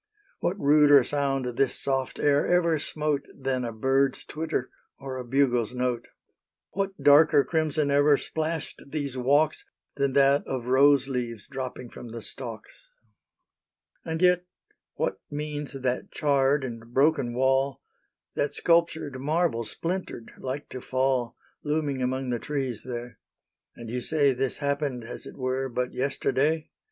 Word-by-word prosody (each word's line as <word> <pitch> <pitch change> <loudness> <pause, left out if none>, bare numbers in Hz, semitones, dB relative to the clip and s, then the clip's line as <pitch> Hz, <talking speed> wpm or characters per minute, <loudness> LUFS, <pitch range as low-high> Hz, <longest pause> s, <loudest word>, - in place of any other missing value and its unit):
What 190 +3 -1
ruder 145 -2 +6
sound 135 -1 0
this 125 +2 0
soft 135 -1 -1
air 145 0 +2
ever 170 -3 +3
smote 150 -1 -2
Than 130 -1 -1
a 120 - -3
bird's 135 +4 +1
twitter 155 -4 -3 0.3
or 135 -1 -6
a 130 - -4
bugle's 125 -2 +1
note? 125 -1 -1 0.6
What 195 0 -3
darker 145 0 +6
crimson 155 -2 0
ever 145 0 +5
splashed 160 +1 -3
these 140 -2 -3
walks 145 +5 +2 0.3
Than 140 -1 +1
that 140 +1 +4
of 130 -3 -3
rose 135 +1 +5
leaves 120 -5 -3
dropping 130 -3 -6
from - - -9
the 115 -1 -7
stalks? 120 - -8 1.2
And 160 +2 -3
yet 180 -1 +4 0.5
what - - -1
means 150 0 -4
that 130 -2 -2
charred 140 -1 +2
and 115 -2 -7
broken 140 -4 +3
wall, 135 +1 +2 0.5
That 145 - -1
sculptured 165 -5 +1
marble, 155 -4 +1
splintered, 170 - -4
like 135 +3 -4
to 130 - -7
fall, 130 -2 0 0.3
Looming 150 -3 -1
among 130 0 -1
the 120 - -1
trees 135 -6 -3
there?... 120 -1 -7 0.6
And 115 - -9
you 125 +2 -3
say 145 -1 +2
This 130 +1 -2
happened, 140 -3 -2
as 115 - -7
it - - -10
were, 130 +1 -1
but 125 +1 -2
yesterday? 140 +3 0
135 Hz, 140 wpm, -27 LUFS, 125-150 Hz, 1.2 s, ruder